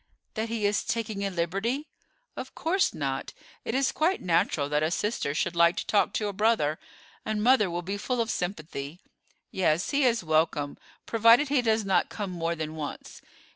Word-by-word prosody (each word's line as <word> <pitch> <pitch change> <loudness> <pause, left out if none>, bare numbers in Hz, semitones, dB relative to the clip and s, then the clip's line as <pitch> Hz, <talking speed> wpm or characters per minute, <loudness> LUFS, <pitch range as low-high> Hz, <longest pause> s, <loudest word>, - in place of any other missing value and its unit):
"That 220 0 -3
he 225 -2 -1
is 205 0 +1
taking 220 -3 -2
a 200 - 0
liberty?" 195 - -2 0.5
"Of - - -7
course 370 +4 +1
not. 135 -2 -3 0.3
It 225 - -3
is 270 0 +2
quite 345 +5 +1
natural 165 -4 +1
that 150 +1 0
a 155 - +1
sister 175 -5 -1
should 170 - -1
like 170 +1 +5
to - - -2
talk 205 - +2
to 210 - -1
a 205 - -3
brother: 200 -8 +1 0.4
and 215 -1 -2
mother 240 -5 +4
will 175 +1 -3
be 195 +3 -3
full 250 +4 -2
of 230 -1 0
sympathy. 155 -3 -4 0.5
Yes, 175 -1 +1
he 285 0 +2
is 235 -5 +2
welcome, 155 -2 0 0.3
provided 230 +5 +5
he 280 -3 +3
does 220 -2 +1
not 195 - +2
come 205 -3 -4
more 170 -1 -2
than 155 -1 -5
once. 150 -2 -7
200 Hz, 185 wpm, -27 LUFS, 165-230 Hz, 0.5 s, like